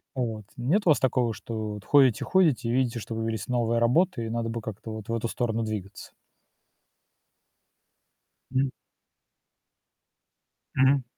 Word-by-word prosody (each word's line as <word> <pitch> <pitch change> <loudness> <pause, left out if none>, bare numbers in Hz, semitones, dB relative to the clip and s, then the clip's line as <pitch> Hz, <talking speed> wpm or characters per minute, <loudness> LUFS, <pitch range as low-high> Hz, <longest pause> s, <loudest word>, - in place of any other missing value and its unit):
Вот. 115 -5 -3
Нет 150 - +1
у - - +4
вас 145 - +4
такого, 125 -3 +1
что 110 0 -5
вот 105 0 -9
ходите, 135 -6 +5
ходите, 160 -11 +2
и - - +1
видите, 125 -1 +1
что 115 +1 -6
появились 110 -1 -3
новые 120 -2 +1
работы 125 +2 +2
и - - -4
надо 115 0 -2
бы 115 0 -4
как-то 110 +1 -7
вот 110 -1 -7
в - - -1
эту 115 0 -1
сторону 115 -1 -1
двигаться? 105 -3 -6 2.4
М. 130 0 +1 2.0
Мгм. 135 0 +4
115 Hz, 140 wpm, -27 LUFS, 110-130 Hz, 2.4 s, ходите